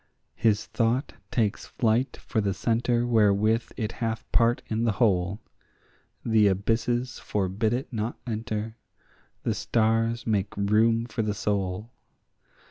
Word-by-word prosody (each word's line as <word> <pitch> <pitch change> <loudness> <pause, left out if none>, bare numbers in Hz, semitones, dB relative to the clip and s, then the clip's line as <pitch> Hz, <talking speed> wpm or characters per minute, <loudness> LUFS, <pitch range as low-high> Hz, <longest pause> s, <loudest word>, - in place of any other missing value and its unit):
His 105 -2 +1
thought 120 +4 0 0.2
takes 110 -4 0
flight 120 +2 0
for 110 - -2
the 100 -2 -1
centre 120 +1 +1
wherethrough 110 0 +2
it 110 -2 -2
hath 115 -1 -3
part 120 0 +3
in 110 +1 -1
the 115 -3 +2
whole; 95 -1 +1 0.9
The 110 -2 +4
abysses 115 +5 0
forbid 105 +2 -1
it 125 +2 -3
not 110 +1 -2
enter: 110 -1 -4 0.7
the - - +1
stars 115 +1 +1
make 105 -3 -1
room 110 +3 +3
for 120 -1 -3
the 105 -1 -1
soul. 100 +1 -2
110 Hz, 130 wpm, -26 LUFS, 105-115 Hz, 0.9 s, The